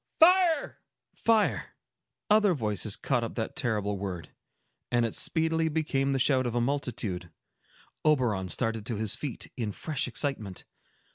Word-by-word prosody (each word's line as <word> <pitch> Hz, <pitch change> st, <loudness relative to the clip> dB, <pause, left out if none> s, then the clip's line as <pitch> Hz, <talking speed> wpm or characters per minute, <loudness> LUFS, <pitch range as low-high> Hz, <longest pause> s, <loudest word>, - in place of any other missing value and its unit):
"Fire!" 345 Hz, -2 st, +5 dB, 0.3 s
Fire! 225 Hz, -2 st, +1 dB, 0.5 s
Other 210 Hz, -3 st, +4 dB
voices 105 Hz, -, -1 dB
caught 125 Hz, -4 st, 0 dB
up 115 Hz, -, -5 dB
that 110 Hz, -2 st, -3 dB
terrible 105 Hz, -7 st, -1 dB
word, 90 Hz, -5 st, -5 dB, 0.6 s
and 120 Hz, -1 st, +3 dB
it 115 Hz, -, -3 dB
speedily 160 Hz, 0 st, +2 dB
became 150 Hz, -3 st, 0 dB
the 135 Hz, -, +1 dB
shout 130 Hz, -1 st, +2 dB
of 120 Hz, -, -3 dB
a -, -, +2 dB
multitude. 120 Hz, -9 st, -2 dB, 0.7 s
Oberon 120 Hz, -11 st, +2 dB
started 115 Hz, -1 st, -1 dB
to 120 Hz, -, -1 dB
his 105 Hz, -1 st, 0 dB
feet, 140 Hz, -6 st, -5 dB
in 110 Hz, -4 st, -2 dB
fresh 145 Hz, +6 st, -2 dB
excitement. 120 Hz, -7 st, -3 dB
125 Hz, 140 wpm, -29 LUFS, 105-155 Hz, 0.7 s, Fire